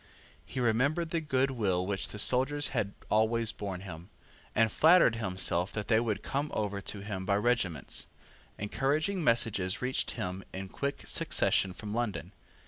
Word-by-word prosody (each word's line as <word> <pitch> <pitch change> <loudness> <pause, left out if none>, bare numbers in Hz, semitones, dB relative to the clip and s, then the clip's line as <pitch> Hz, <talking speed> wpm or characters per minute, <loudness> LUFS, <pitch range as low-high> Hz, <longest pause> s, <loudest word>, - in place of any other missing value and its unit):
He 130 - -5
remembered 140 +8 +1
the 165 - 0
good 135 -3 +1
will 95 -7 0
which 100 0 -2
the - - -8
soldiers 135 +6 +3
had 105 -6 -2 0.2
always 110 +1 +3
borne 100 -4 -5
him, 90 -1 -9 0.5
and 110 -1 +3
flattered 160 -7 +5
himself 95 -3 -1
that 105 0 -4
they 110 -2 +5
would 110 -3 -2
come 140 +2 -2
over 100 -2 -2
to 100 0 -6
him 100 -2 -5
by 100 +1 +1
regiments. 105 - 0 0.5
Encouraging 150 - 0
messages 110 -7 +2
reached 125 +1 -1
him 90 +1 -4
in 95 0 -6
quick 140 +6 -4
succession 95 - +1
from 105 +3 -7
London. 115 -5 -2
110 Hz, 155 wpm, -30 LUFS, 100-130 Hz, 0.5 s, flattered